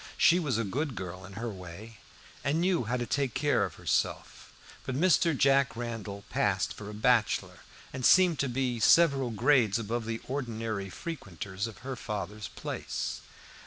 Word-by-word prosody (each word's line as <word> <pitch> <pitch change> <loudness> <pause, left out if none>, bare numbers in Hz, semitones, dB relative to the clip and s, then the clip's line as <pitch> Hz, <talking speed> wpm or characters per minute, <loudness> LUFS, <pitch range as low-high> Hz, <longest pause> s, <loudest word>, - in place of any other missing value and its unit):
She 175 +2 +5
was 145 -9 0
a 115 - 0
good 135 +6 -2
girl 90 -1 -6
in 95 - -11
her 115 +3 -4
way, 95 +4 -10 0.5
and 145 +3 +1
knew 175 -7 +1
how 120 +4 -1
to 120 - -2
take 135 -2 -1
care 145 +3 +2
of - - -8
herself; - - -2 0.3
but 130 - -4
Mr. 165 -1 +3
Jack 140 0 +3
Randall 115 -4 -5
passed - - +1
for 105 -1 -9
a - - -7
bachelor, 115 0 +1 0.3
and 130 -1 -5
seemed 180 +1 +5
to 140 - +1
be 125 -1 -1
several 140 -1 +5
grades 120 -2 +3
above 115 +1 -3
the 115 0 -3
ordinary 115 -7 -3
frequenters 100 - -5
of 110 -5 -10
her 135 -1 -3
father's 105 -2 -5
place. - - -4
120 Hz, 165 wpm, -29 LUFS, 105-140 Hz, 0.5 s, She